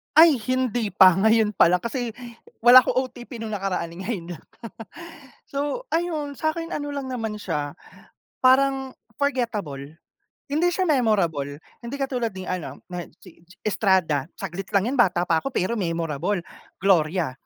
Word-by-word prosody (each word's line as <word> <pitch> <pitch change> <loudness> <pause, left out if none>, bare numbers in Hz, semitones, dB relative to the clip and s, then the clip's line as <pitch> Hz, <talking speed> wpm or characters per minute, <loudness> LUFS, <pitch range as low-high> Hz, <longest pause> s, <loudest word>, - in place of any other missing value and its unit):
Ay, 320 -1 +8
hindi 245 -4 -1
pa 185 -2 +7
ngayon 220 +1 +3
pa 170 - +5
lang 180 - +3
kasi 235 +3 -3 0.5
wala 245 +2 +9
ako 255 +1 0
OTP 240 -1 -10
nung 220 -1 -5
nakaraan 185 -4 -3
ngayon 180 -3 -5
lang. 155 - -18 1.0
So, 290 - -3
ayun 320 - -2
sa'kin 330 +4 -2
ano 290 -1 -4
lang 280 -2 -4
naman 225 -4 -4
siya 150 -7 -3 0.7
parang 265 +1 +3 0.3
forgettable. 210 - -2 0.6
Hindi 325 +4 +2
siya 375 +2 0
memorable, 175 - +1 0.2
hindi 235 +4 -5
katulad 255 -4 -2
ni 185 - -6
ano 160 -7 -5
nad 175 -1 -5 0.2
si 180 - -16
Ji 180 +2 -19
Estrada. 190 -9 +1
Saglit 180 +3 -6
lang 195 - +4
yan 275 - -2
bata 180 -6 +4
pa 165 -1 +3
ako - - -6
pero 190 +6 0
memorable. 170 +1 -2 0.4
Gloria, 175 -4 +2
215 Hz, 150 wpm, -24 LUFS, 175-260 Hz, 1.0 s, wala